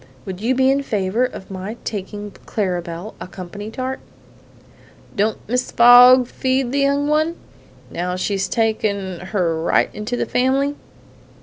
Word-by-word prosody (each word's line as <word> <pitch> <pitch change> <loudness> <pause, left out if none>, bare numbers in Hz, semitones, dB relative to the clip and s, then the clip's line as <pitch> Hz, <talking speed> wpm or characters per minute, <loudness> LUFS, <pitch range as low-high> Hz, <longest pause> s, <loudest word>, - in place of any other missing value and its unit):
Would 190 0 -6
you 245 +4 +1
be 265 +1 +4
in 275 +1 +1
favor 210 -1 0
of 200 -6 -8
my 195 +4 -6
taking 205 0 -5 0.2
Clara 185 -5 -1
Belle 170 +5 -7
a - - -6
company 190 +3 -8
tart?" 260 +3 -4 1.2
"Don't 215 0 -1
Mrs. 250 +3 -1
Fogg 245 +1 +8
feed 260 0 -1
the 280 - 0
young 280 +1 +1
one, 310 +3 +1 0.6
now 180 +1 -3
she's 195 +1 -1
taken 205 -5 -1
her 180 -4 -1
right 165 - +2
into 215 +4 -4
the - - -1
family?" 270 +3 +1
220 Hz, 145 wpm, -20 LUFS, 190-255 Hz, 1.2 s, Fogg